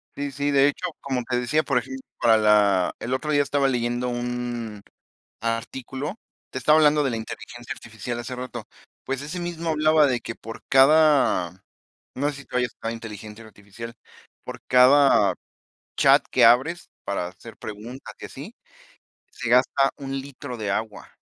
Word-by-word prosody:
Sí, 145 0 -4
sí, 145 +1 -2
de 140 0 +5
hecho, 145 +5 -2
como 130 -2 -2
te 125 -1 +1
decía, 140 +6 +1
por 135 -5 0
ejemplo, 130 +2 -4 0.2
para 115 -1 +5
la 105 -4 +3
el 125 - -3
otro 150 +4 -2
día 145 -1 +4
estaba 140 -1 +1
leyendo 120 -1 -1
un 120 -3 -4 0.6
artículo, 130 - -4 0.3
te - - -7
estaba 150 +5 +4
hablando 150 -1 +4
de 135 - 0
la 115 - -2
inteligencia 120 +3 -8
artificial 115 0 -7
hace 125 +2 -5
rato. 125 -2 -6 0.4
Pues 135 0 -3
ese 150 +5 -5
mismo 170 -1 -4
hablaba 155 -1 +4
de 125 -3 0
que 115 - -5
por 115 0 -10
cada, 135 - +4 0.5
no 145 +2 0
sé 145 - -6
si - - -17
tú 125 - -3
hayas 125 -1 0
usado 115 - -4
inteligencia 110 -1 -9
artificial, 110 +2 -10 0.5
por - - -8
cada 135 +3 +5 0.6
chat - - +5
que - - +4
abres 130 +9 +4 0.2
para 95 -3 -2
hacer 100 +6 -13
preguntas 110 +5 -9
y - - -6
así, - - -10 0.8
se 115 - -5
gasta 130 +2 +3
un 135 -1 -4
litro 135 -2 -8
de 105 -3 -2
agua. 110 +1 -5
125 Hz, 165 wpm, -24 LUFS, 115-140 Hz, 0.8 s, de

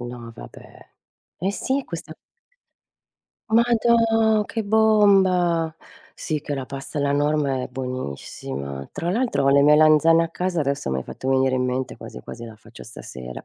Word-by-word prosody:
No 120 -1 -8
vabbè. - - -14 0.5
Eh 190 +3 -1
si 265 +6 -1
è 275 - -5
questa 165 -2 -7 1.4
madò 225 -2 +3
che 225 +2 -4
bomba! 195 -6 +3 0.4
Sì 155 -2 -3
che 145 0 -4
la 135 -2 -5
pasta 135 +3 -6
alla 140 0 +1
norma 145 -2 0
è - - -5
buonissima. 70 - -6
Tra 170 - -3
l'altro 235 - 0
ho - - +3
le 140 0 +5
melanzane 155 +2 +5
a - - -5
casa 180 0 -2
adesso 140 - -2
mi 65 - -1
hai - - -4
fatto 130 - -7
venire 130 0 +2
in 125 0 0
mente 125 0 -3
quasi 60 - -10
quasi 120 - -9
la 110 -2 -11
faccio 110 - -15
stasera.. 60 -1 -9
150 Hz, 160 wpm, -23 LUFS, 130-190 Hz, 1.4 s, le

